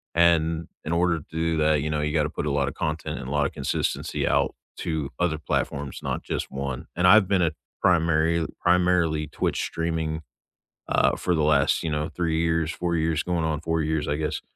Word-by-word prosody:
And 85 -1 +3 0.2
in 80 - -4
order 85 -1 +2
to - - -15
do 80 0 0
that, 75 -2 +2
you 75 - -2
know, 75 -1 0
you 75 0 -1
gotta 75 -2 +2
put 75 - -3
a - - 0
lot 70 -1 +1
of 70 - -3
content 75 -4 -3
and 65 - -7
a - - -5
lot 75 -1 +2
of - - -1
consistency - - -1
out - - +1 0.2
to 80 -4 -2
other 85 -3 +1
platforms, 70 -2 -2
not - - -3
just - - -3
1. 70 -2 -4
And 90 +1 +1
I've 100 0 +7
been 95 -3 +2
a 80 - +2 0.3
primary 85 -1 +3 0.2
primarily 90 -4 +2
Twitch - - -1
streaming, 80 -1 -2 0.7
uh, - - +3
for 90 - 0
the 80 - +1
last, 75 -2 +3
you 80 - -1
know, 75 +1 -1
3 80 -2 0
years, 80 -1 +1
4 85 -1 -2
years 80 -1 0
going 85 -2 -1
on 80 -1 -1
4 80 0 0
years, 75 -1 0
I 75 - 0
guess, 75 -1 -2
80 Hz, 210 wpm, -25 LUFS, 75-85 Hz, 0.7 s, I've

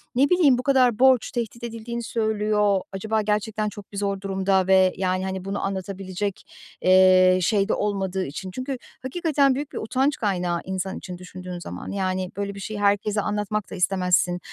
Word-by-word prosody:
ne 275 +3 +4
bileyim, 315 -8 +5
bu 250 - -3
kadar 255 -4 +3
borç 260 -3 +4
tehdit 235 0 -4
edildiğini 235 0 -5
söylüyor, 210 -3 +1
acaba 220 +3 -1
gerçekten 210 +1 -1
çok 205 -1 -12
bir 200 - -8
zor 200 -1 -1
durumda 190 -1 +1
ve, 190 -1 +5
yani, 185 0 0
hani, 190 -1 -4
bunu 195 +1 -3
anlatabilecek, 195 0 -4 0.4
eee, 185 0 +6
şeyde 200 +2 +2
olmadığı 195 -2 -1
için. 185 +7 -6
Çünkü 255 +5 -4 0.2
hakikaten 280 -1 +1
büyük 290 +1 -4
bir - - -7
utanç 265 +6 0
kaynağı 180 -5 -1
insan 190 0 -4
için 180 -1 -8
düşündüğün 180 0 -8
zaman. 90 - -7
Yani, 185 -2 -2
böyle 200 0 -3
bir - - -8
şeyi 210 +1 -5
herkese 205 +1 +2
anlatmak 210 0 -2
da - - -5
istemezsin. 180 -1 +1
200 Hz, 170 wpm, -24 LUFS, 185-220 Hz, 0.4 s, eee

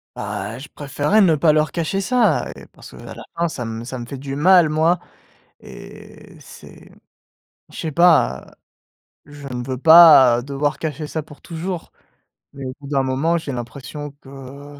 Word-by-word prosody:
Bah, 105 +4 -5
je 140 - -11
préférerais 145 +7 -1
ne 175 -6 +4
pas 155 +1 +3
leur 155 0 0
cacher 170 +3 -2
ça 215 - +1
et - - -14
parce - - -15
qu'à - - -11
la - - -10
fin 170 -1 0
ça 125 - -6
m 115 0 -6
ça 125 +1 -7
me 120 - -7
fait 135 +3 -8
du 135 +1 -6
mal 175 0 +5
moi, 160 +3 +1 0.6
et - - -14
c'est - - -15 0.8
je - - -13
sais 160 -3 -4
pas 160 - +2 0.7
je 145 -1 -11
ne 125 -1 -5
veux 130 -1 -4
pas 145 -6 +7
devoir 140 +2 -2
cacher 155 -1 -5
ça 160 +1 -4
pour 145 -1 -16
toujours. 170 +1 -6 0.6
Mais 140 - -8
au 130 - -5
bout 140 - -11
d'un 140 -2 0
moment 135 +6 0
j'ai 155 -4 -5
l'impression 135 +4 -7
que 140 +2 -12
145 Hz, 175 wpm, -20 LUFS, 135-165 Hz, 0.8 s, pas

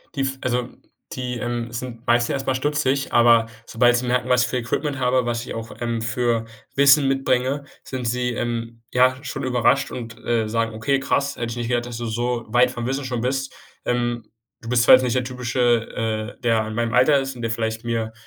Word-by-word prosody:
Die 140 - -1
f 135 0 -1
also, 125 0 -1 0.4
die, 125 -1 -4
ähm, 120 -1 -3
sind 120 0 -7
meistens 120 0 +3
erstmal 135 -1 -1
stutzig. 140 0 0
Aber 115 -1 +5 0.2
sobald 120 +1 +3
sie 125 0 -3
merken, 125 0 0
was 125 0 +4
für 125 0 -2
Equipment 135 +3 -2
habe, 125 -1 +2
was 120 0 -2
ich - - -6
auch, 115 0 -6
ähm, 115 -1 -1
für 120 -1 0 0.3
Wissen 140 0 +6
mitbringe, 135 +1 0 0.2
sind 130 -2 -5
sie, 125 +1 0
ähm, 115 -1 -4
ja, 130 +1 +4
schon 130 - -5
überrascht 130 +2 +2
und, 115 -2 -7
äh, 115 -2 +1
sagen: 115 0 -1
„Okay, 135 +5 0
krass. 140 +1 0
Hätte 120 - -3
ich 120 - -6
nicht 120 - -3
gedacht, 120 -1 0
dass 120 -1 -6
du 120 - -4
so 120 +1 -2
weit 125 +2 +4
vom 120 -2 -5
Wissen 135 +1 -2
schon 125 -3 -2
bist. 135 +2 -2 0.3
Ähm, 120 -2 -1 0.4
du 115 - -8
bist 120 -1 +3
zwar - - +9
jetzt 130 - +1
nicht 125 -1 0
der 125 - +1
typische, 120 -3 -1
äh, - - -37
der 115 -3 +1
in 110 - -5
meinem 115 -1 -1
Alter 140 +4 +5
ist 135 -1 -4
und 120 - -9
der 115 -1 -1
vielleicht 115 0 -2
mir, 115 -1 -2
120 Hz, 215 wpm, -22 LUFS, 115-130 Hz, 0.4 s, zwar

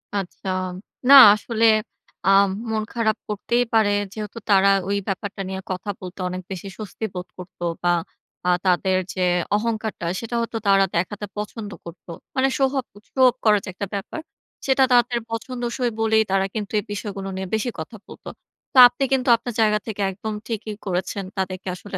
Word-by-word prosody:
আচ্ছা। 195 -1 -4 0.6
না - - +10 0.2
আসলে 225 +1 0 0.6
আ - - +4 0.4
মন 215 -1 0
খারাপ 220 -2 +1
করতেই 235 +4 0
পারে, 220 -2 +4 0.2
যেহেতু 215 +1 -7
তারা 195 -1 +5 0.2
ওই 200 - +1
ব্যাপারটা 200 0 -4
নিয়ে 190 0 -4
কথা 185 +3 -4
বলতে, 185 +1 -9
অনেক 185 0 -5
বেশি 190 +1 -6
স্বস্তি 215 +1 -6
বোধ 180 0 -6
করত, 180 0 -11 0.2
বা 175 0 +3 0.5
আ - - +4 0.2
তাদের 185 +1 +2 0.2
যে, 185 - -3 0.3
অহংকারটা, 220 -3 -2
সেটা 230 +1 -5
হয়তো 230 0 -3
তারা 195 0 +5
দেখাতে 205 +4 -2
পছন্দ 210 0 -5
করত 170 +1 -11 0.3
মানে 265 0 +3
সোহাব 270 -1 +1 0.3
সো 265 - 0
অফ - - -5
করার 210 -2 +4
একটা 200 - -4
ব্যাপার। 200 +10 -5 0.4
সেটা 265 0 +4
তাদের 240 0 +3
পছন্দসই 240 +1 -3
বলেই, 220 0 +3
তারা 195 0 +2
কিন্তু 210 -2 -4
এই - - -5
বিষয়গুলো 200 -1 -5
নিয়ে 190 0 -4
বেশি 220 +3 -1
কথা 160 +8 -7
বলত। - - -13 0.5
তো - - -2
আপনি 245 +3 -4
কিন্তু 260 -1 +1
আপনার 235 +1 -6
জায়গা 210 -1 +3
থেকে 210 -2 -4
একদম 215 +3 -5
ঠিকই 215 -2 -4
করেছেন। 190 +1 -2
তাদেরকে 190 0 -3
আসলে 195 +1 -7
210 Hz, 165 wpm, -22 LUFS, 190-230 Hz, 0.6 s, না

